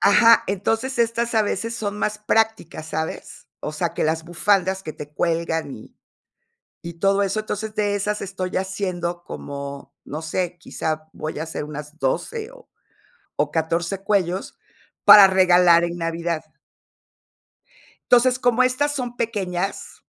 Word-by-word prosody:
Ajá, 230 +3 +6
entonces 225 +7 -1
estas 235 0 0
a 220 - +4
veces 230 +3 -2
son 210 -2 -4
más 210 0 -1
prácticas, 210 -7 0
¿sabes?, 160 +1 -5
o - - -4
sea, 170 +2 -2
que - - -1
las 160 +1 0
bufandas 190 +2 +1
que 155 - -6
te 150 0 -10
cuelgan 165 -2 -1
y 110 - -14 0.9
y 170 0 -7
todo 195 +1 +3
eso. 195 +2 -1
Entonces, 215 0 -5
de 205 -2 0
esas 210 +1 -2
estoy 190 -1 -4
haciendo 180 -3 -3
como, 140 0 -7
no 150 +3 -6
sé, 175 +2 -2
quizá 155 -2 -4
voy 155 -1 -5
a - - -1
hacer 160 -2 -5
unas 150 +1 -8
12 435 - -2
o - - -17 0.7
o 145 0 0
14 170 +4 -1
cuellos 190 -2 -1 0.5
para 205 -2 +11
regalar 180 -2 +5
en 170 0 -3
Navidad. 165 -1 -2 1.7
Entonces, 250 +1 +5
como 245 0 +3
estas 285 +3 +1
son 245 -3 -4
pequeñas 195 -5 -3
190 Hz, 145 wpm, -22 LUFS, 165-215 Hz, 1.7 s, para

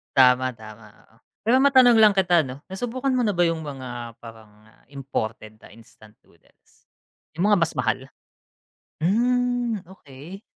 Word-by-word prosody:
Tama, 130 -1 +4
tama, 110 -2 -14 0.2
oo. - - -28 0.3
Pero 235 +4 +2
matanong 260 -4 +5
lang 215 -2 +6
kita, 180 -4 +2
ano, 130 +2 -9
nasubukan 245 +7 -4
mo 250 - +1
na 210 - +1
ba 175 - -1
yung 165 -1 -3
mga 125 -4 -8
parang 115 -2 -13 0.4
imported 110 -6 -6
na - - -17
instant 110 -1 -19
noodles? - - -30 0.5
Yung 175 +6 0
mga 205 - +4
mas - - -3
mahal? - - -1 1.0
Hmm, 245 +4 0 0.2
okey. 155 +5 -13
160 Hz, 140 wpm, -23 LUFS, -, 1.0 s, lang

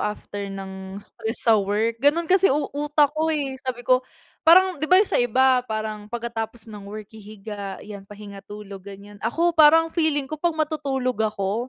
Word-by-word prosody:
after 205 -1 -4
ng 190 0 -8
stress 220 +2 -2
sa 220 -3 +5
work. 220 +4 -1
Ganun 295 +5 +3
kasi 380 +3 +4
u 285 +1 -1
utak 295 0 +1
ko 315 +1 -1
eh, 290 -4 -1
sabi 245 -2 -5
ko 255 0 +4 0.5
parang 365 -1 +6
'di 310 - -2
ba 365 - +6
yun 400 - +6
sa - - +2
iba, 255 +2 +3
parang 215 -1 -4
pagkatapos 230 0 -4
ng 205 -1 -9
work 215 -1 -9
hihiga, 210 -2 -8
'yan 200 -2 -10
pahinga, 205 -1 -10
tulog, 205 -2 -9
ganyan. 200 +1 -12
Ako 335 +11 +1
parang 325 +1 +5
feeling 310 -4 +1
ko 310 -1 -6
pag 340 -1 0
matutulog 275 -6 -2
ako, 215 +2 -1
235 Hz, 180 wpm, -23 LUFS, 205-295 Hz, 0.5 s, parang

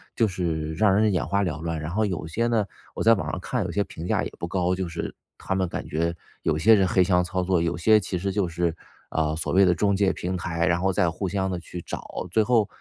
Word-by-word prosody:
就 115 - +3
是 80 -5 -2
让 95 +5 +3
人 105 +1 +3
眼 90 - 0
花 100 +4 +1
缭 80 -5 -3
乱。 80 -1 -2
然 75 +2 -5
后 110 +4 +1
有 90 -6 -3
些 115 +9 0
呢， 115 -3 +2 0.3
我 - - -2
在 115 - +7
网 80 -8 -2
上 95 - -3
看 120 +4 -2
有 85 - -3
些 100 +3 +1
评 85 -3 -8
价 - - +1
也 - - -5
不 85 - -3
高 90 0 0
就 95 -1 -2
是 85 0 -5 0.2
他 - - -3
们 95 -1 +1
感 - - -5
觉 85 +2 -1 0.3
有 75 -2 +1
些 110 +9 +6
人 95 -3 +4
黑 90 0 +4
箱 90 -1 +3
操 95 +1 -2
作， 90 -2 +2
有 85 0 -1
些 110 +5 +5
其 95 -2 -3
实 95 +3 -2
就 95 -1 0
是， 85 -1 -1 0.4
呃， 80 -1 0
所 80 - -2
谓 95 +2 +6
的 90 -2 +4
中 100 +4 +2
介 95 -1 +3
平 90 +1 -3
台， 85 -1 -1
然 85 -1 +1
后 95 +1 +2
再 90 -1 +2
互 95 +3 -3
相 95 0 -1
地 90 - -2
去 85 +1 -8
找， 90 - -6
最 110 - +3
后， 115 -3 +3
90 Hz, 290 characters per minute, -25 LUFS, 85-100 Hz, 0.4 s, 在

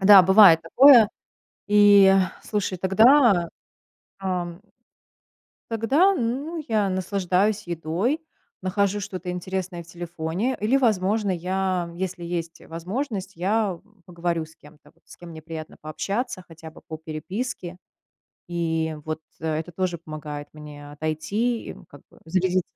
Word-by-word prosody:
Да, 195 0 +9
бывает 190 -3 +7
такое, 240 - +7 0.6
и, 205 -2 +7 0.3
слушай, 200 -3 -2
тогда, 200 - +4 0.7
ам, 180 -2 -3 1.1
тогда, 270 - +3
ну, 285 +5 -3
я 210 -3 +1
наслаждаюсь 190 +2 0
едой, 175 - -1 0.4
нахожу 200 +2 0
что-то 185 -2 -6
интересное 180 0 -4
в - - -20
телефоне 175 +7 -3
или, 225 +6 +3
возможно, 210 -3 +1
я, 185 0 -2
если 180 -2 -4
есть 170 -1 -5
возможность, 195 - -5
я 195 0 0 0.3
поговорю 170 -2 -2
с 160 - -19
кем-то, 150 0 -19
вот - - -34
с - - -14
кем 175 -1 -12
мне 160 - -9
приятно 160 -1 -8
пообщаться 195 +6 -4
хотя 160 0 -11
бы - - -17
по 160 0 -6
переписке. 180 +4 -5 0.7
И 165 -2 -1
вот 155 0 -4 0.2
это 160 +2 -3
тоже 180 0 -2
помогает 150 -2 -7
мне 150 -1 -11
отойти 195 +11 -2
и, - - -6
м, - - -15
как 145 - -15
бы - - -21
зарядиться, 185 +2 +1
185 Hz, 130 wpm, -24 LUFS, 165-205 Hz, 1.1 s, Да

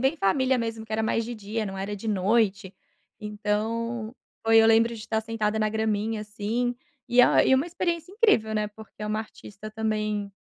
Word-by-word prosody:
bem 270 +5 +2
família 260 +2 +2
mesmo, 225 -1 -3
que 220 - -10
era 220 - 0
mais 225 +1 0
de 240 - -5
dia, 215 +1 -4
não 195 -1 -6
era 195 +2 -3
de 205 +2 -6
noite. 205 -1 +1 0.5
Então, 220 +2 -2 0.3
foi 225 0 +5
eu - - +5
lembro 225 +1 +4
de 225 - -8
estar 220 0 -1
sentada 220 -1 -2
na 215 0 +2
graminha, 220 0 -1
assim, 220 +4 -2 0.3
e 245 +1 +5
a - - +5
e 265 - +5
uma 270 +5 +2
experiência 345 0 -2
incrível, 405 - +3
né, 215 0 0
porque 215 0 -13
é 210 - -2
uma 215 +1 -1
artista 215 -1 -9
também, 215 -2 -2
220 Hz, 195 wpm, -26 LUFS, 210-230 Hz, 0.5 s, foi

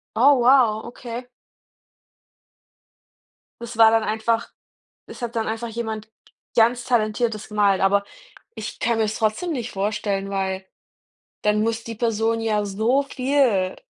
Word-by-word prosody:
Oh 265 +4 +5
wow, 240 -3 +4
okay. 240 0 -7 2.4
Das 235 -1 -7
war 225 -1 +7
dann 225 -1 +3
einfach 220 +2 -1 0.6
es - - -11
hat 235 0 -4
dann 225 -1 -1
einfach 225 +1 -3
jemand 220 -1 -5 0.4
ganz 235 +1 +3
talentiertes 220 -2 0
gemalt, 205 -2 +2
aber 200 +1 +3 0.5
ich - - -7
kann 235 -1 0
mir 220 - +3
das 215 - -2
trotzdem 220 +11 -1
nicht 245 -4 -4
vorstellen, 195 0 -2
weil 190 -1 -2 0.8
dann 210 0 +2
muss 225 +1 -1
die 230 - -6
Person 225 0 0
ja 215 -2 0
so 220 +8 +1
viel 255 -9 +1
225 Hz, 135 wpm, -23 LUFS, 210-235 Hz, 2.4 s, war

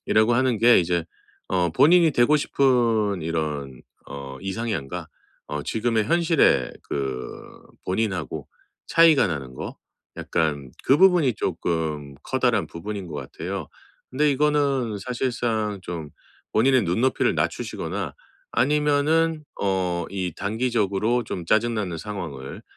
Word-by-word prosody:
이라고 110 +2 +3
하는 130 -2 +2
게 120 -3 +6
이제 85 -1 0 0.4
어 90 -3 +1
본인이 165 - +5
되고 125 +5 +4
싶은 115 - +2
이런 75 -5 -3 0.3
어 70 -1 -8
이상향과 95 -6 -4 0.4
어 75 0 -3
지금의 110 -1 0
현실의 165 - +3 0.2
그 65 -3 -4 0.4
본인하고 95 - -2 0.4
차이가 165 -6 +5
나는 70 -6 -4
거 - - -7 0.4
약간 75 -6 -1
그 135 - +5
부분이 175 - +5
쪼끔 80 -7 -2
커다란 125 -4 +1
부분인 100 +2 -6
것 75 - -7
같아요. 85 +1 -6 0.4
근데 145 +3 +2
이거는 140 -5 +1
사실상 115 -3 -2
좀 85 -4 -6 0.5
본인의 130 +2 +4
눈높이를 115 +10 +1
낮추시거나 - - -3 0.4
아니면은 150 +2 +2 0.2
어 90 -3 0
이 95 -3 -3
단기적으로 110 +1 0
좀 90 -5 -5
짜증 115 +4 +2
나는 95 -6 -2
상황을 80 -9 -7
105 Hz, 260 characters per minute, -24 LUFS, 85-130 Hz, 0.5 s, 게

